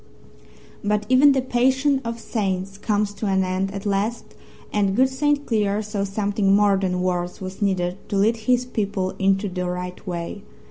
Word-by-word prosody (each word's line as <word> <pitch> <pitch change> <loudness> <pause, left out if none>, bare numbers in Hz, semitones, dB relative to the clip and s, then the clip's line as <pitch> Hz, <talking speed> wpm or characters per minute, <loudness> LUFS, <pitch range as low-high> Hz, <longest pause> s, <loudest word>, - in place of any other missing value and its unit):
But 210 0 0
even 270 +2 +6
the 265 -1 0
patience 260 +2 +2
of 230 0 -4
saints 195 -3 -3
comes 210 -1 0
to 210 - -4
an 190 -1 +2
end 185 +1 -1
at 195 0 -6
last, 205 +4 -1 0.4
and 200 -2 +1
good 260 +3 +4
St. 290 +2 0
Cleer 210 -2 0
saw 205 -1 -2
something 200 0 +1
more 205 -1 +4
than 185 -2 -1
words 180 -1 -1
was 185 +2 -7
needed 185 -2 0
to 200 - 0
lead 220 +4 +3
his 245 +3 +1
people 200 -5 -2
into 195 +1 +2
the 180 -1 -3
right 180 +2 -6
way. 175 +3 -4
205 Hz, 175 wpm, -23 LUFS, 190-230 Hz, 0.4 s, even